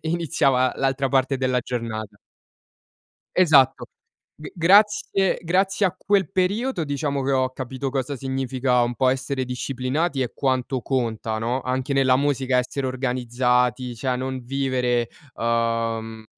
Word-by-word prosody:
i 160 - -3
iniziava 135 -7 +1
l'altra 135 0 0
parte 135 +1 +1
della 130 -1 +1
giornata. 115 -4 -5 1.2
Esatto, 150 -8 +4 0.5
g 150 - -9
grazie 195 +3 +3
grazie 190 +4 +1
a 185 - -2
quel 195 0 +1
periodo 195 +1 0
diciamo, 140 -1 -2
che 135 +1 0
ho 130 -1 +1
capito 130 +1 -5
cosa 135 +1 -2
significa 130 -1 0
un 120 0 -1
po' 130 +1 +2
essere 130 +1 -1
disciplinati 130 +4 -2
e 125 - -4
quanto 130 -1 -1
conta, 115 -4 -2
no, 120 +4 -1
anche 130 +2 -2
nella 130 -2 +4
musica 135 -2 +1
essere 130 +2 -2
organizzati, 125 -1 0
cioè 125 +2 -2
non 130 +1 -4
vivere, 125 -2 0 0.3
uhm, 115 -1 -1
130 Hz, 130 wpm, -23 LUFS, 125-140 Hz, 1.2 s, Esatto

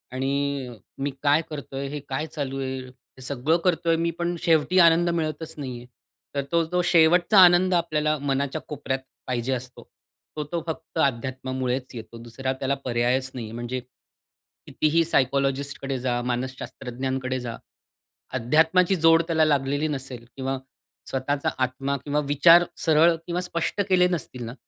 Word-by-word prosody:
आणि 140 0 -1 0.3
मी 140 - -1
काय 145 +2 +4
करतोय, 140 -2 -5
हे 150 +1 -5
काय 135 +3 -2
चालू 140 -3 -4
आहे? 130 0 -3
हे 125 +1 -19
सगळं 140 +5 0
करतोय 170 -2 +2
मी, 170 +1 0
पण 175 0 -1
शेवटी 165 +3 +3
आनंद 170 0 +5
मिळतच 160 -1 -2
नाहीये. 125 -4 -6 0.5
तर 140 - 0
तो 170 0 +3
जो 180 0 +2
शेवटचा 175 +4 +4
आनंद 180 +1 +5
आपल्याला 155 -3 +1
मनाच्या 140 +2 -1
कोपऱ्यात 135 -2 -3 0.3
पाहिजे 125 +1 -1
असतो. 125 0 -6 0.5
तो 150 - -1
तो 170 -1 -1
फक्त 160 +1 -6
अध्यात्मामुळेच 130 0 -2
येतो. 115 0 -9
दुसरा 130 +3 -3
त्याला 140 0 0
पर्यायच 125 +2 0
नाहीये. 115 -4 -6
म्हणजे 120 +2 -4 0.9
कितीही 160 +2 +2
सायकॉलॉजिस्टकडे 135 -1 0
जा, 120 -1 -1
मानसशास्त्रज्ञांकडे 130 +1 -3
जा. 120 -2 -6 0.8
अध्यात्माची 160 +9 +3
जोड 165 0 +6
त्याला 160 -2 +3
लागलेली 145 +1 +1
नसेल 135 -4 -5
किंवा 135 0 -2 0.5
स्वतःचा 140 +2 -1
आत्मा 135 +2 -2
किंवा 145 0 0
विचार 165 +4 +7 0.2
सरळ 165 +1 +5
किंवा 175 +1 -1
स्पष्ट 180 +2 -2
केले 180 -1 +5
नसतील 130 -7 -4
ना, 115 - -6
140 Hz, 140 wpm, -25 LUFS, 130-165 Hz, 0.9 s, विचार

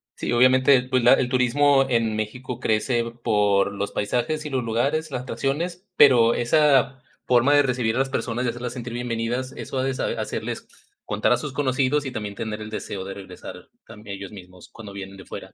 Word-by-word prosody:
sí, - - -4
obviamente, 130 +2 +5
pues, 130 -1 0
la - - +7
el 130 -2 +1
turismo 135 +2 +3
en 115 -3 +1
México 120 +3 -5
crece 120 +1 +1 0.2
por 100 -1 +2
los 100 0 -3
paisajes 125 +9 -1
y - - -4
los 130 -3 -1
lugares, 140 +8 -1
las 125 -1 -4
tradiciones, 170 +8 -3
pero, 120 -4 +6
esa 135 0 +3 0.2
forma 125 +3 +4
de 145 - +6
recibir 125 -4 0
a - - 0
las 135 0 +1
personas 125 -1 -2
y - - +1
hacerlas 120 +1 -5
sentir 120 -2 -6
bienvenidas, 120 +1 -3
eso - - -6
ha - - 0
de 135 0 0
sa - - -2
hacerles - - -4 0.4
contar 105 +1 0
a 125 - +4
sus 140 +2 -6
conocidos 140 +1 +1
y 130 - -4
también 105 -4 -5
tener 110 -1 -5
el 105 - -7
deseo 100 -3 -5
de 95 - -6
regresar 100 -1 -11 0.2
también, 105 -3 -9
ellos 100 -1 -8
mismos 90 -3 -13
cuando 105 -4 -11
vienen 95 0 -8
de 95 - -12
fuera. - - -9
125 Hz, 200 wpm, -23 LUFS, 110-135 Hz, 0.4 s, la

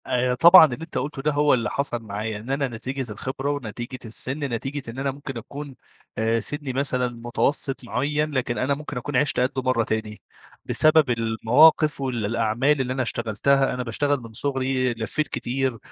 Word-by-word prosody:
آآ، 125 -1 +1
طبعًا 170 +6 +9
اللي 125 -6 -3
أنت 165 - -6
قُلته 140 0 -3
ده 150 +2 +1
هو 145 0 +3
اللي 120 -2 +1
حصل 140 -4 -2
معايا، 105 +1 -4
إن 110 +5 -10
أنا 140 0 0
نتيجة 130 +1 -5
الخبرة 130 +6 -4
ونتيجة 125 -1 -5
السن، 130 +5 -5
نتيجة 135 0 -4
إن 125 - -8
أنا 135 0 0
ممكن 135 -2 -7
أكون 140 +4 -8 0.4
آآ، 115 +1 +1
سني 145 +1 -4
مثلًا 125 -2 0 0.2
متوسط 135 +3 -1
معيّن، 150 +5 -1
لكن 125 -3 -1
أنا 130 +2 +1
ممكن 145 -2 -7
أكون 140 +3 -4
عِشت 145 0 +1
قَده 130 +1 0
مرّة 130 -2 +1
تاني 110 -1 -4 0.4
بسبب 155 -2 +4
المواقف 125 +7 +4
والأعمال 120 +3 +1
اللي 130 0 -2
أنا 130 - -1
اشتغلتها. 120 +4 +1
أنا 125 0 -3
باشتغل 140 +4 0
من 115 -1 -11
صغري 130 0 -1
لفيّت 115 +7 -2
كتير 130 -1 -2
130 Hz, 175 wpm, -24 LUFS, 115-140 Hz, 0.4 s, طبعًا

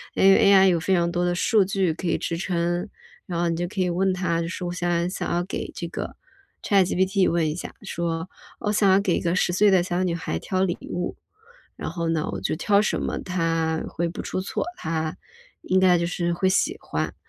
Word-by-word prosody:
因 - - +1
为 195 - +6
AI 195 -1 +7
有 170 - +2
非 180 - -2
常 170 0 +1
多 175 0 0
的 175 0 +1
数 215 +3 +3
据 190 -3 0
可 170 +2 -5
以 - - +1
支 170 - -3
撑， 175 0 -1 0.4
然 175 -2 -3
后 175 - +1
你 165 - 0
就 175 +1 -2
可 195 +2 -7
以 180 - +1
问 190 +2 +1
它， 180 -2 0
就 165 - -3
是 180 +1 -5
我 175 - -3
想 175 -1 0
想 185 - -3
要 175 0 +1
给 185 - -5
这 170 - -4
个 - - -5 0.5
ChatGPT 190 0 +2
问 165 -2 +1
一 150 - -1
下， 175 - -7
说： 165 0 -3 0.3
“我 210 - -1
想 205 -2 +3
要 190 - +5
给 190 -3 +1
一 - - -2
个 175 0 0
10 175 - +1
岁 205 +3 +5
的 185 -2 +4
小 180 0 -1
女 175 -2 0
孩 80 - -3
挑 185 - -1
礼 175 -2 0 0.2
物， 175 0 -3 0.6
然 - - -5
后 165 0 -2
呢 160 -1 -1
我 - - -3
就 - - 0
挑 200 +5 +3
什 - - 0
么 - - -2
她 165 -3 -1
会 170 - -2
不 - - -7
出 185 - -3
错？ 190 - -3
她 160 -1 -3 0.5
应 185 0 +2
该 185 -1 +5
就 170 - 0
是 175 -1 -1
会 190 +2 +1
喜 320 - +1
欢。 - - -3
175 Hz, 270 characters per minute, -24 LUFS, 170-190 Hz, 0.6 s, AI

